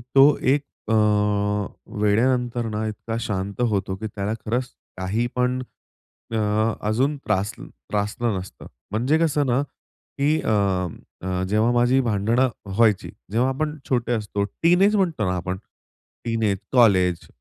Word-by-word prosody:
तो 140 +2 +7
एक 140 +2 +3 0.3
अ, - - +3 1.1
वेळेनंतर 120 +3 +2
ना 110 0 -2
इतका 110 +1 -5
शांत 100 0 -3
होतो 95 -2 -1
की 110 +3 -5
त्याला 100 0 -3
खरंच 120 +4 0 0.3
काहीपण 120 +6 -1 0.7
अ 110 - 0 0.5
अजून 135 +7 +1
त्रासल 105 -5 -2
त्रासलं 105 +1 -2
नसतं 95 +1 -9 0.3
म्हणजे 125 +9 +2
कसं 150 -3 +2
ना 125 +2 +2
की 145 +2 -3
अ, 95 -2 -1
जेव्हा 110 +3 +3
माझी 120 +2 +3
भांडणं 115 +3 +2 0.2
व्हायची 105 +1 +2 0.2
जेव्हा 125 +4 +2
आपण 150 +3 -2
छोटे 120 -2 +1
असतो, 105 -2 -1
टिन 170 - +2
एज 205 +2 +5
म्हणतो 170 - +1
ना 90 - 0
आपण, 90 +1 -3 0.7
टिन 115 -1 -1
एज, 100 -2 +2
कॉलेज 95 -8 +4
115 Hz, 130 wpm, -23 LUFS, 100-130 Hz, 1.1 s, तो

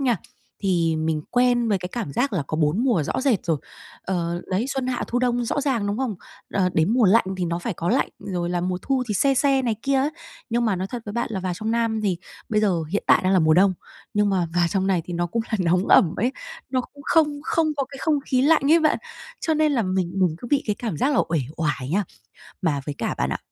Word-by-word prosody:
nha, 250 -4 +2 0.5
thì 170 -4 +1
mình 155 -1 -1
quen 245 -1 +3
với 200 -3 +2
cái 180 - -5
cảm 225 -12 -4
giác 250 - 0
là 170 -7 0
có 155 - -3
4 160 +9 +1
mùa 230 -12 +2
rõ 145 - -2
rệt 255 -10 +1
rồi, 165 -2 +2 0.5
ờ, 175 -2 -2
đấy, 195 +6 0
xuân 270 -2 -2
hạ 255 -1 -1
thu 245 - 0
đông 245 -1 +1
rõ 285 +5 -1
ràng, 260 -7 0
đúng 205 +2 -2
không? 260 -5 -1 0.4
Ờ, 190 -2 +3
đến 160 +5 +3
mùa 250 -2 +4
lạnh 210 +3 +5
thì 185 - -1
nó 170 0 -1
phải 185 +2 -4
có 170 - -3
lạnh, - - +2
rồi 175 -3 -3
là 175 0 0
mùa 180 +1 -1
thu 265 -2 0
thì 210 - -1
se 275 +6 +3
se 270 0 +3
này 230 -4 0
kia 275 0 +1
ấy. 280 +3 +1 0.4
Nhưng 235 +1 +1
mà 215 -5 +1
nói 185 - -2
thật 245 -2 -5
với 205 - -4
bạn 235 +1 -1
là 190 - -2
vào 185 -1 -2
trong 215 +5 -3
Nam 230 -1 0
thì 190 -5 0 0.3
bây 210 -1 +2
giờ 185 -6 +1
hiện 205 - -1
tại - - +6
đang 185 - +3
là 190 - +5
mùa 155 -2 +4
đông, 190 +2 +4 0.4
nhưng 210 0 +3
mà 185 -3 +1
vào 175 -1 +3
trong 190 -2 0
này 185 -3 +2
thì 175 - -5
nó 175 0 0
cũng 230 +6 -2
là 220 - 0
nóng 180 +2 +1
ẩm 165 - +5
ấy, 245 +6 0 0.4
nó 255 - +1
cũng 285 +3 -12
không 300 -3 +2
không 320 0 +1
có 275 - 0
cái 275 0 -11
không 310 -3 +2
khí 255 -2 +2
lạnh 295 0 +4
ấy 335 - +6
bạn. 310 - +2 0.4
Cho 320 - +1
nên 305 -1 +2
là 245 -5 +2
mình 185 -2 -1
mình 180 -4 +2
cứ 240 - -8
bị 285 0 +3
cái 210 -2 0
cảm 220 -9 -3
giác 280 - +1
là - - +4
uể 165 - +1 0.2
oải 150 -5 -2
nha. 200 +4 +1 0.6
Mà 150 -5 +1
với 145 - -3
cả, - - -1
bạn - - 0
ạ, - - -2
210 Hz, 270 wpm, -23 LUFS, 175-255 Hz, 0.6 s, tại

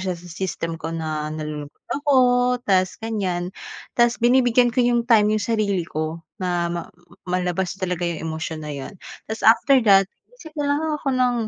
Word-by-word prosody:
siya 180 - -3
sa 175 - -14
system 170 -1 -4
ko 160 0 -6
na 155 -2 -3
nalulungkot 150 -1 -7 0.2
ako 290 -1 +2 0.5
tas 185 -2 +2
ganyan. 190 -5 -3 0.4
Tas 240 0 +3
binibigyan 245 0 +4
ko 250 - +3
yung 240 -1 +2
time 215 -3 +5
yung 205 - -3
sarili 200 -6 0
ko 155 +2 -3 0.2
na 175 -1 0
ma 170 -1 -3 0.5
malabas 180 +1 -1
talaga 180 -2 -2
yung 170 -2 -3
emosyon 160 0 -4
na 150 - -4
yun. 135 -1 -6 0.4
Tas, 220 - -2
after 235 +4 +6
that 195 -1 +5 0.3
isip 320 - -10
na 290 - 0
lang 290 - 0 0.2
ako 285 - -4
ng 250 -1 +2
185 Hz, 170 wpm, -22 LUFS, 165-235 Hz, 0.5 s, after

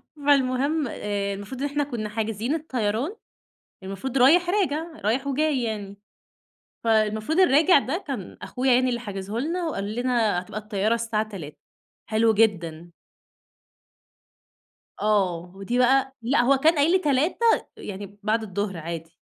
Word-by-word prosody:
فالمهم، 280 +1 +2
آآ 200 -2 -3
المفروض 205 +7 -7
إن 285 - +1
إحنا 290 +1 -1
كنا 235 -7 -4
حاجزين 225 +5 -2
الطيران، 260 - -2 0.7
المفروض 195 +8 -4
رايح 330 +8 +5
راجع، 340 -5 0 0.2
رايح 260 +6 +1
وجاي 280 -2 +1
يعني. 205 -3 -4 0.9
فالمفروض 220 - +2
الراجع 325 -1 +6
ده 310 +8 -3
كان 250 -10 -5
أخويا 255 +1 0
يعني 255 +1 +3
اللي 240 -1 -1
حاجزه 205 -1 -5
لنا، 335 +7 -2
وقال 205 -6 -4
لنا 240 -6 +1
هتبقى 210 +3 -6
الطيارة 210 +1 0
الساعة 225 -2 -1
15:00، 165 -8 -8 0.5
حلو 220 +1 +3
جدًا. 175 -6 0 2.1
آه، 185 -5 +1
ودي 200 +6 -2
بقى 265 +1 +3
لأ 245 +3 +2
هو 270 +3 +4
كان 315 +5 +4
قايل 295 +2 +3
لي 375 - +5
15:00 295 0 +1 0.4
يعني 200 0 -8
بعد 220 +2 +1
الظهر 200 -2 -3
عادي. 165 0 -6
230 Hz, 135 wpm, -25 LUFS, 205-275 Hz, 2.1 s, الراجع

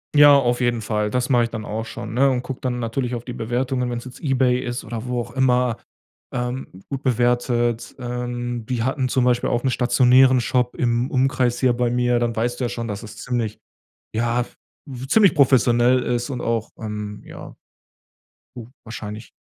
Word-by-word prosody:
Ja, 145 -1 +8
auf 125 -2 +1
jeden 120 -2 +1
Fall. 105 -1 -1
Das 125 +3 -1
mache 120 -3 +4
ich - - -5
dann 110 -2 -6
auch 110 +2 -4
schon, 110 -1 -7
ne? 135 +3 +4
Und 125 -2 -1
gucke 135 -1 -6
dann 125 -1 -2
natürlich 120 +1 -2
auf 120 0 -7
die 125 - -6
Bewertungen, 125 +2 -1
wenn's 120 0 -4
jetzt 125 - -10
eBay 130 -4 +2
ist 125 -1 -4
oder 115 +1 -6
wo 125 0 -1
auch 120 +1 -8
immer. 125 -2 +2 0.5
Ähm, 125 +1 -3 0.2
gut 135 0 -4
bewertet, 120 -1 +1
ähm, 120 -1 -4
die 125 -3 -1
hatten 130 +1 0
zum 130 0 +2
Beispiel 125 -1 +2
auch 120 - 0
'n 135 - +2
stationären 125 +1 +4
Shop 125 +1 0
im 120 0 0
Umkreis 130 -2 +1
hier 130 -2 +3
bei 120 0 0
mir, 125 0 +2
dann 120 -1 -1
weißt 120 +2 -1
du - - -2
ja - - -1
schon, 115 -1 -4
dass 105 0 -5
es 110 -2 -10
ziemlich 120 -4 -3 0.6
ja, 120 +2 +1 0.6
ziemlich 200 +4 +5
professionell 125 -3 +4
ist 120 +2 -1
und 125 -3 -4
auch 115 -2 -1
ähm 105 -1 -5
ja - - -11 1.0
gut, 120 -1 -9
wahrscheinlich. 110 -1 -8
120 Hz, 190 wpm, -22 LUFS, 120-125 Hz, 1.0 s, Ja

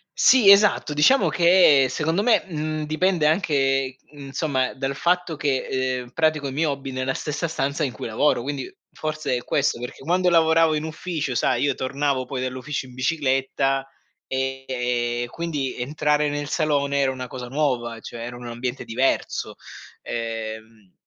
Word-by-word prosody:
Sì 240 -7 +6
esatto, 200 -6 +5
diciamo 205 - +4
che 170 -6 +5
secondo 160 +8 0
me, 240 -1 +4
mhmm, 155 -4 -3
dipende 165 +1 +1
anche 135 -6 +1 0.2
insomma 135 -2 -2
dal 135 0 -3
fatto 175 0 0
che, 130 -2 -1
ehm, 125 -1 -11
pratico 155 0 0
i - - -5
miei 155 +4 0
hobby 140 -2 -3
nella 130 +1 -2
stessa 150 +3 -3
stanza 145 -1 -1
in 130 - -2
cui 105 - -7
lavoro, 120 +3 +1
quindi 140 0 -4 0.2
forse 155 -4 -2
è 120 - -5
questo; 140 -4 0
perché 125 +2 -8
quando 180 +5 +1
lavoravo 165 -1 +4
in 150 - -1
ufficio, 155 -4 -4
sai, 120 +1 +1
io 140 -1 +2
tornavo 135 0 -1
poi 130 0 -4
dall'ufficio 130 +2 -4
in 125 - -14
bicicletta 135 -1 0 0.4
e 135 0 -3
e 120 -1 -1
quindi 150 -5 -3
entrare 150 +3 +1
nel 145 0 -3
salone 145 -3 0
era 135 -1 +2
una 130 -1 -6
cosa 125 -1 -7
nuova, 120 -4 -1
cioè 115 - -9
era 120 0 -7
un 120 0 -9
ambiente 120 +2 -4
diverso, 125 +3 -1 0.5
ehm 110 -3 -6
140 Hz, 160 wpm, -23 LUFS, 130-155 Hz, 0.5 s, Sì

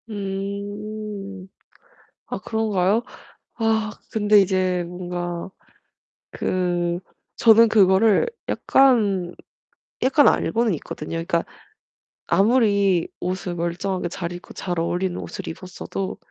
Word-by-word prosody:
음. 200 0 -5 0.8
아 - - -4
그런가요? 215 -1 +1 0.5
아 220 -2 +1 0.2
근데 210 -2 +4
이제 185 -2 +1
뭔가 175 0 -5 0.8
그 175 -1 -1 0.4
저는 230 0 +7
그거를 205 - +4 0.2
약간 205 -10 +3 0.7
약간 275 +2 +5
알고는 230 -3 +1
있거든요. 150 0 -7
그러니까 165 0 0 0.8
아무리 200 -3 +3
옷을 180 0 -3
멀쩡하게 175 +2 -2
잘 170 0 -5
입고 175 0 -9
잘 175 -2 -3
어울리는 175 +2 -1
옷을 - - -7
입었어도 185 +2 -5
195 Hz, 210 characters per minute, -23 LUFS, 180-215 Hz, 0.8 s, 저는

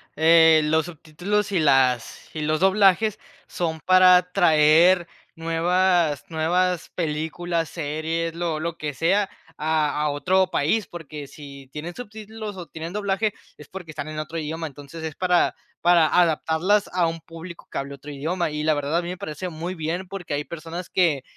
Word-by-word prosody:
eh, 160 0 +6
los 160 +1 +2
subtítulos 175 +5 -3
y 190 - +1
las 130 -5 +1
y 155 - -4
los 155 +2 0
doblajes, 195 +2 +3 0.3
son 160 -3 -3
para 185 -1 +5
traer 170 0 +5 0.3
nuevas 165 -1 +1
nuevas 175 +2 0
películas, 165 +1 -2
series, 160 +1 -3
lo 170 -2 -2
lo 170 0 -3
que 150 -2 -4
sea, 195 +7 +1 0.3
a 155 -1 0
a 150 - +1
otro 185 +6 +2
país, 185 +7 0
porque 150 -4 -8
si 140 -2 -12
tienen 165 +4 -6
subtítulos 215 -1 -8
o 180 -2 -7
tienen 165 +2 -7
doblaje 205 +1 0 0.2
es, 150 - -13
porque 180 -4 -9
están 145 0 -6
en 155 0 -5
otro 155 +2 -5
idioma. 160 +1 -4
Entonces, 145 +3 -10
es 160 -2 -5
para 180 -1 +2 0.3
para 175 -2 +5
adaptarlas 175 +4 +2
a 180 -2 +2
un 165 0 -4
público 165 +1 -11
que - - -6
hable 140 0 -4
otro 145 +2 -12
idioma. 160 +4 -2
Y 150 0 -3
la 155 - +3
verdad, 145 +2 -1
a - - +2
mí 175 - -6
me 180 - -5
parece 160 +3 -5
muy 170 +3 -5
bien, 170 +3 -3
porque 180 -4 -6
hay 145 0 -2
personas 170 +2 -7
que 165 -7 +2
165 Hz, 170 wpm, -23 LUFS, 155-180 Hz, 0.3 s, eh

